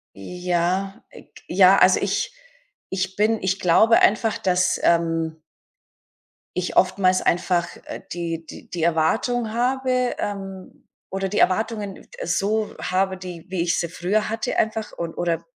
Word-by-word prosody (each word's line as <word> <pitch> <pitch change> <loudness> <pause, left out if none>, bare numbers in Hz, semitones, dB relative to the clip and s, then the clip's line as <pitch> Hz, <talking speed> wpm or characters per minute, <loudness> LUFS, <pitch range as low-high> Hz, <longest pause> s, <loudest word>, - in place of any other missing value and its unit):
Ja, 180 - -2
äh, - - -14
g - - -19
ja, 190 +1 +6
also, 185 0 +5
ich 200 - -1 0.6
ich 190 0 -2
bin 215 +1 +1
ich 190 +1 0
glaube 220 +6 +5
einfach, 220 +1 +3
dass, 185 -1 +1
ähm 165 -1 +1 1.2
ich 180 0 -2
oftmals 185 0 +3
einfach, 175 0 +1 0.2
äh, - - -8
die 165 -1 -4
die - - -12
die 170 -2 -5
Erwartung 215 +8 +1
habe 255 0 0
ähm, 195 -2 -6 0.2
oder 195 0 -2
die 205 - -1
Erwartungen 210 0 0 0.2
so 215 - 0
habe, 190 +1 0
die 180 -3 -9
wie 185 -2 -1
ich 170 -1 +1
sie 170 - -2
früher 190 +5 -1
hatte 225 0 -3
einfach 220 0 -1
und 170 -1 -5
oder 170 -1 -1
190 Hz, 140 wpm, -23 LUFS, 175-215 Hz, 1.2 s, ja